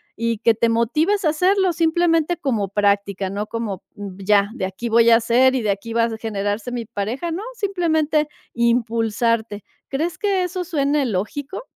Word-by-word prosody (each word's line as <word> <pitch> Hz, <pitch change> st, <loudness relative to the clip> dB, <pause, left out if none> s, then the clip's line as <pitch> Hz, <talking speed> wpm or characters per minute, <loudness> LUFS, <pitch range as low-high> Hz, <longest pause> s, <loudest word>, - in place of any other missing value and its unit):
y 230 Hz, -1 st, -1 dB
que 230 Hz, -, +5 dB
te 230 Hz, +1 st, +1 dB
motives 305 Hz, -, +1 dB
a -, -, +4 dB
hacerlo 365 Hz, +3 st, +2 dB
simplemente 330 Hz, 0 st, +2 dB
como 225 Hz, -8 st, -1 dB
práctica, 200 Hz, -1 st, 0 dB
no 205 Hz, +2 st, -3 dB
como 220 Hz, -5 st, -4 dB
ya 200 Hz, +1 st, 0 dB
de 190 Hz, -, -3 dB
aquí 190 Hz, +5 st, -6 dB
voy 230 Hz, +1 st, +5 dB
a 230 Hz, -, +8 dB
hacer 240 Hz, +3 st, +3 dB
y 250 Hz, -, -1 dB
de 210 Hz, -, +2 dB
aquí 215 Hz, +4 st, -5 dB
va 230 Hz, 0 st, +2 dB
a 230 Hz, -1 st, -1 dB
generarse 205 Hz, +1 st, -3 dB
mi 235 Hz, -2 st, -4 dB
pareja, 235 Hz, +12 st, -4 dB
no 340 Hz, +4 st, -3 dB
simplemente 320 Hz, -7 st, 0 dB, 0.3 s
impulsarte, 230 Hz, -2 st, 0 dB, 0.2 s
¿crees 320 Hz, +5 st, -3 dB
que 395 Hz, -3 st, +1 dB
eso 360 Hz, 0 st, -3 dB
suene 290 Hz, -4 st, 0 dB
lógico? 265 Hz, -, -4 dB
235 Hz, 170 wpm, -21 LUFS, 210-315 Hz, 0.3 s, a